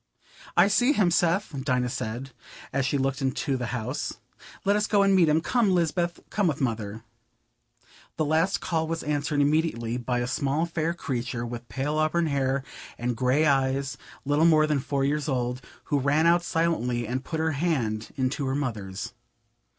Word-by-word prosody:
"I 175 +3 +7
see 245 +7 +3
him, 195 -9 +3
Seth," 175 +1 +1
Dinah 125 -3 +1
said, 120 +4 -4 0.4
as 135 -1 +1
she 140 - +1
looked 135 +1 -1
into 135 +1 0
the 125 -2 -3
house. 125 +3 -3 0.5
"Let 200 +1 +4
us 210 0 +1
go 205 -1 +4
and 195 -1 +4
meet 170 -4 +5
him. 155 +2 +3
Come, 210 -1 +2
Lisbeth, 170 0 0
come 205 -3 +1
with 155 -3 -1
Mother." 110 -4 -2 1.1
The 155 - +1
last 165 +6 +1
call 160 -2 -1
was 165 0 -3
answered 145 0 0
immediately 140 -6 +1
by 125 0 -1
a 120 - 0
small 140 +4 0
fair 170 0 -2
creature 125 -6 -3
with 120 0 -7
pale 145 +3 -1
auburn 160 +2 +2
hair 135 -2 0 0.3
and 120 0 -2
grey 130 +6 +2
eyes, 135 -1 +1 0.3
little 145 +3 +3
more 155 -2 +5
than 150 -2 +1
four 140 0 -1
years 150 +1 0
old, 125 -1 -1 0.2
who 145 - 0
ran 145 +4 +2
out 170 +1 +5
silently 165 -9 0
and 130 +4 -3
put 160 +2 -4
her 160 0 +1
hand 135 -9 -1
into 135 +1 -1
her 130 - 0
mother's. 110 -9 -4
145 Hz, 175 wpm, -26 LUFS, 125-165 Hz, 1.1 s, I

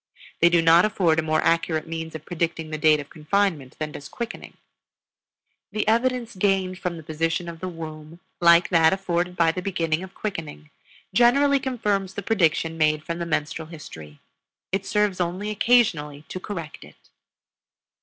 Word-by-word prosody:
They 170 - +6
do 170 -1 +3
not 165 +2 +6
afford 175 -6 +2
a - - +3
more 155 0 0
accurate 165 -1 +1
means 160 0 -5
of 155 - -8
predicting 165 -2 -3
the 155 - -4
date 155 0 +5
of 145 - -9
confinement 155 -3 -1
than 155 -1 -4
does 140 -1 -9
quickening. 235 0 -7 1.1
The 215 -1 -2
evidence 235 0 +1
gained 190 -1 0
from 175 -2 -3
the 160 - -10
position 165 +3 -2
of 165 -1 -7
the 185 - -4
womb, 160 -1 -9 0.2
like 170 0 +5
that 165 -2 +5
afforded 180 -2 -1
by 165 -2 +3
the 180 - -5
beginning 165 -4 -1
of 190 0 -10
quickening, 160 - -6 0.4
generally 275 +4 +4
confirms 210 -8 -2
the 200 - -4
prediction 165 -5 +1
made 155 0 +2
from 170 0 -4
the 170 - -3
menstrual 155 0 -2
history; 80 - -11 0.5
it 195 +1 -2
serves 210 -3 +1
only 185 +5 -2
occasionally 175 -11 +2
to 185 - -5
correct 170 -6 -7
it. - - -15
170 Hz, 165 wpm, -24 LUFS, 155-195 Hz, 1.1 s, They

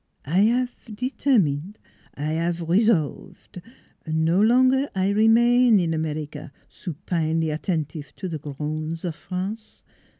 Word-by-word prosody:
I 185 +9 +3
'ave 245 -3 -3
determine! 205 - 0 0.4
I 150 +2 -2
'ave 170 +1 -1
resolve 185 -3 0 0.6
1 160 0 0
No 170 +4 +3
longer 255 +5 +4
I 190 +1 +1
remain 230 +2 +5
in 165 -2 0
America, 155 -1 -4 0.2
supinely 160 -1 -2
attentive 150 -2 -3
to 190 - -5
the 160 -3 -4
groans 155 +3 -5
of 170 - -2
France. 195 +7 -6
170 Hz, 120 wpm, -24 LUFS, 155-220 Hz, 0.6 s, remain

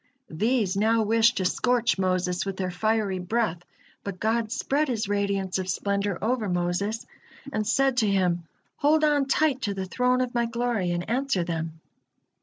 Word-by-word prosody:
These 215 +3 +1
now 220 +2 +3
wished 225 +2 +3
to 190 - 0
scorch 240 +2 +1
Moses 185 -1 0
with 195 -1 -4
their 185 -1 -2
fiery 210 0 0
breath, 180 -2 -1 0.4
but 195 -2 -6
God 225 0 0
spread 290 +5 0
His 225 -5 -1
radiance 200 -2 -1
of 185 0 -4
splendor 200 0 -1
over 225 -2 0
Moses, 180 +5 -1 0.5
and 215 -1 -1
said 270 -2 +2
to 220 -4 +3
him: 180 -4 +1 0.3
"Hold 305 +2 +3
on 290 -2 +3
tight 280 -1 +2
to 200 -4 -2
the 190 -1 -3
Throne 250 +6 +1
of 250 -1 -2
My 235 -1 +1
Glory, 235 -5 -1
and 175 0 -2
answer 245 -5 0
them." 165 -1 -4
210 Hz, 170 wpm, -26 LUFS, 185-240 Hz, 0.5 s, now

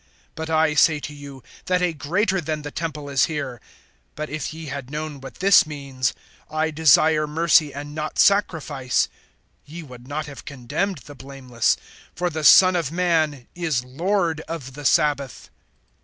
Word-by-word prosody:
(6)But 160 0 -5
I 160 -1 +2
say 150 +1 +4
to 150 - -7
you, 140 -2 -11 0.2
that 180 0 +1
a 175 -2 +1
greater 180 +6 0
than 155 -1 -4
the 145 - -6
temple 155 -3 -5
is 140 -2 +2
here. 140 -7 -5 0.6
(7)But 155 0 -4
if 155 -2 -4
ye 160 0 -8
had 140 -3 -6
known 150 -1 -5
what 135 - -10
this 190 -3 +5
means, 135 -4 -3 0.3
I 155 +1 -1
desire 155 0 +4
mercy 155 -1 +3
and 145 +2 -8
not 155 0 -5
sacrifice, 160 -10 +2 0.5
ye 160 +4 -9
would 125 -3 -13
not 150 +2 -3
have 140 -2 -10
condemned 145 +6 -3
the 145 - -10
blameless. 130 -3 -1 0.4
(8)For 175 +1 -1
the 155 0 -4
Son 185 +4 +7
of 165 -5 -1
man 160 -7 0
is 160 -8 -1
Lord 165 +5 -1
of 140 -6 -6
the 145 +1 -9
sabbath. 145 -4 +1
150 Hz, 165 wpm, -23 LUFS, 140-165 Hz, 0.6 s, Son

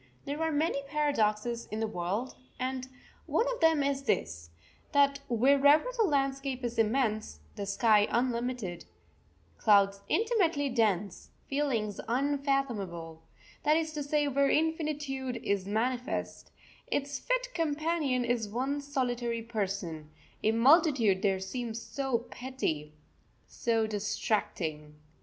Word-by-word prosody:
There 290 +3 -3
are 320 0 +1
many 295 -1 0
paradoxes 235 -6 0
in 215 - -4
the 225 - +1
world 210 +4 -3 0.3
and 255 0 -3 0.4
one 460 - +2
of 475 - -7
them 325 -3 +4
is 275 -1 0
this, 85 - -2 0.4
that 280 -1 +4
wherever 280 - +5
the 455 -3 +3
landscape 275 -4 -1
is 240 -1 -2
immense, 215 - 0 0.2
the 200 - -5
sky 210 +1 +4
unlimited, 240 -6 -1 0.7
clouds 200 -2 +4
intimately 345 - +2
dense, 205 -6 0 0.2
feelings 250 -8 -1
unfathomable 240 - -1 0.4
that 305 +1 +3
is 320 -1 -2
to 300 - -3
say 290 +1 +1
where 280 0 +2
infinitude 295 -5 -1
is 195 -1 -1
manifest 245 +5 -2 0.4
its 285 0 -2
fit - - -1
companion 310 -5 0
is 235 -3 0
one 265 +6 -1
solitary 245 -4 -2
person; 195 -8 -3 0.3
a 220 - +3
multitude 240 - +4
there 195 -2 +2
seems 230 +3 -4
so 250 -1 -2
petty, 160 - -3 0.5
so 225 -2 0
distracting. 190 -7 -2
250 Hz, 120 wpm, -30 LUFS, 210-285 Hz, 0.7 s, wherever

